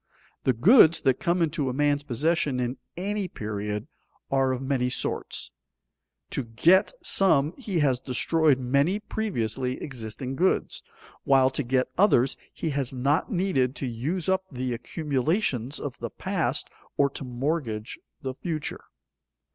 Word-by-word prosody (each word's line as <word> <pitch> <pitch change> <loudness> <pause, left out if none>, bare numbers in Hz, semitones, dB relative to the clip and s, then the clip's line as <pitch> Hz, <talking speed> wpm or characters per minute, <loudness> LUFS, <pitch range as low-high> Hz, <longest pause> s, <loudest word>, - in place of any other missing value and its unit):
The 130 - +4
goods 165 - +6
that 130 - +2
come 170 0 +1
into 150 -4 0
a - - -2
man's 145 +1 +2
possession 145 0 0
in 125 +1 -2 0.2
any 200 +1 -2
period 105 - -4 0.4
are 135 -1 +3
of 130 - -2
many 130 -2 0
sorts: 125 - -3 0.8
to 135 - -2
get 140 +12 +4
some 160 -5 +3
he 210 -9 -4
has 130 -4 +2
destroyed 150 +3 +2
many 140 +9 +1
previously 130 - -2
existing 125 0 -5
goods; 185 +6 +1 0.4
while 135 -1 +4
to 140 - -1
get 130 0 0
others 135 - +4 0.2
he 160 - -3
has 135 -2 -2
not 140 - +1
needed 175 - +1
to 140 - -4
use 140 +9 -3
up 190 0 +2
the 125 -1 -2
accumulations 140 - -1
of 140 -4 -6
the - - -4
past - - -1 0.3
or 140 - +5
to - - -6
mortgage 125 -3 -3 0.2
the 130 -1 -3
future. 155 +2 -4
135 Hz, 140 wpm, -26 LUFS, 125-165 Hz, 0.8 s, goods